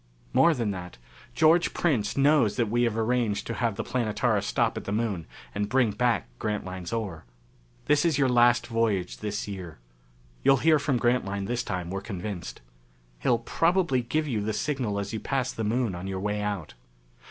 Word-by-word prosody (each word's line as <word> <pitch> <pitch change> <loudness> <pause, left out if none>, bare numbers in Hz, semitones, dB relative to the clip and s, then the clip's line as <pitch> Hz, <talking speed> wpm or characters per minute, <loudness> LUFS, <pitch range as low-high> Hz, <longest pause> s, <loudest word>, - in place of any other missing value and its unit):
"More 170 -1 +5
than 115 -5 -1
that: 90 -8 -7 0.4
George 165 +3 +4
Prince 115 -11 0
knows 140 -6 +4
that 115 -4 0
we 120 +1 +3
have 115 -2 -1
arranged 115 -2 0
to 115 - -3
have 115 -3 -1
the - - -3
Planetara 115 -5 0
stop - - 0
at - - -6
the - - -3
Moon 105 -6 -1 0.3
and 100 0 -2
bring 125 -2 +3
back 120 +3 +1
Grantline's 95 -4 -4
ore.... 100 -8 -3 0.6
This 145 0 +3
is 165 -5 +2
your 140 -2 +3
last 120 0 +4
voyage 115 -6 0
this 105 0 -3
year. 90 -6 -7 0.7
You'll 135 - +6
hear 155 +3 +4
from 140 -3 0
Grantline 110 -5 0
this 120 +3 -1
time, 90 -5 -4
we're 95 0 -3
convinced. 100 -2 -6 0.6
He'll 120 - +2
probably 165 +2 +1
give 155 +6 -1
you 115 -6 -1
the 110 +1 -2
signal 125 -5 -1
as 100 +1 -3
you 110 - -2
pass 130 0 -1
the 115 - -4
Moon 115 0 0
on 90 +2 -6
your 95 -1 -3
way 105 +1 -1
out. 100 -6 -3
115 Hz, 185 wpm, -27 LUFS, 100-125 Hz, 0.7 s, You'll